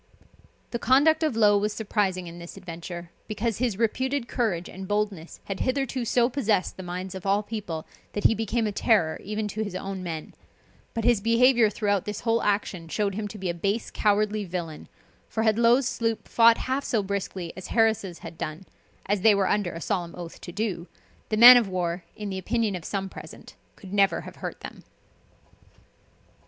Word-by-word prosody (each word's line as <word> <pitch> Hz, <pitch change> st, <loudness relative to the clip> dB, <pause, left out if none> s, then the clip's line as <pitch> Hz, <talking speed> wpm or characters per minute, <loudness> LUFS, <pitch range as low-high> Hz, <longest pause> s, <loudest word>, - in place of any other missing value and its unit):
The 235 Hz, -, -2 dB
conduct 285 Hz, +7 st, +4 dB
of 310 Hz, -7 st, +1 dB
Low 205 Hz, -2 st, +5 dB
was 210 Hz, +1 st, -1 dB
surprising 200 Hz, -4 st, -1 dB
in 170 Hz, 0 st, -9 dB
this 170 Hz, +3 st, -10 dB
adventure, 170 Hz, -1 st, -8 dB, 0.2 s
because 220 Hz, 0 st, -2 dB
his 235 Hz, -6 st, 0 dB
reputed 260 Hz, +3 st, 0 dB
courage 195 Hz, -10 st, -1 dB
and 190 Hz, +1 st, -8 dB
boldness 205 Hz, -5 st, -2 dB
had 195 Hz, -1 st, -5 dB
hitherto 260 Hz, -1 st, -1 dB
so 235 Hz, +1 st, +3 dB
possessed 225 Hz, -7 st, 0 dB
the -, -, -8 dB
minds 180 Hz, +1 st, -5 dB
of 190 Hz, -2 st, -7 dB
all 200 Hz, +2 st, +2 dB
people, 195 Hz, -8 st, -5 dB, 0.3 s
that 205 Hz, -, -3 dB
he -, -, +6 dB
became 225 Hz, +1 st, -1 dB
a 210 Hz, -, 0 dB
terror 195 Hz, -6 st, +2 dB
even 210 Hz, +1 st, -3 dB
to 215 Hz, +1 st, -2 dB
his 200 Hz, -3 st, -6 dB
own 190 Hz, 0 st, -4 dB
men; 165 Hz, -3 st, -6 dB, 0.6 s
but 230 Hz, -, -1 dB
his 235 Hz, -3 st, +3 dB
behaviour 230 Hz, +1 st, +4 dB
throughout 205 Hz, -2 st, 0 dB
this 210 Hz, 0 st, -4 dB
whole 230 Hz, -1 st, +1 dB
action 200 Hz, -4 st, -1 dB
showed 200 Hz, +4 st, -1 dB
him 210 Hz, +1 st, -3 dB
to 210 Hz, -, -9 dB
be 190 Hz, -2 st, -4 dB
a 170 Hz, -, 0 dB
base 200 Hz, +6 st, -2 dB
cowardly 210 Hz, 0 st, +1 dB
villain; 170 Hz, -4 st, -5 dB, 0.4 s
for 220 Hz, -, -1 dB
had 220 Hz, 0 st, +2 dB
Low's 240 Hz, +2 st, +4 dB
sloop 230 Hz, -2 st, -2 dB
fought 230 Hz, 0 st, +6 dB
half 265 Hz, +2 st, -2 dB
so 220 Hz, -6 st, 0 dB
briskly 190 Hz, -3 st, -4 dB
as 185 Hz, -, -8 dB
Harris' 220 Hz, -6 st, +1 dB
had 165 Hz, -1 st, -10 dB
done 155 Hz, +5 st, -5 dB, 0.4 s
(as 200 Hz, 0 st, 0 dB
they 215 Hz, +1 st, +6 dB
were 195 Hz, -1 st, +2 dB
under 205 Hz, -4 st, 0 dB
a 165 Hz, -, -7 dB
solemn 170 Hz, -1 st, -2 dB
oath 175 Hz, -2 st, -9 dB
to 175 Hz, -, -8 dB
do,) 190 Hz, -3 st, -3 dB, 0.4 s
the 215 Hz, -, 0 dB
man 245 Hz, +2 st, +11 dB
of 235 Hz, -4 st, +2 dB
war, 175 Hz, -1 st, -2 dB
in 210 Hz, -2 st, -5 dB
the 190 Hz, -, -3 dB
opinion 220 Hz, +1 st, 0 dB
of 175 Hz, -, -6 dB
some 195 Hz, -1 st, -2 dB
present, -, -, -11 dB, 0.2 s
could 190 Hz, 0 st, -11 dB
never 200 Hz, -1 st, +3 dB
have -, -, -11 dB
hurt -, -, -6 dB
them. -, -, -9 dB
205 Hz, 195 wpm, -26 LUFS, 185-225 Hz, 0.6 s, man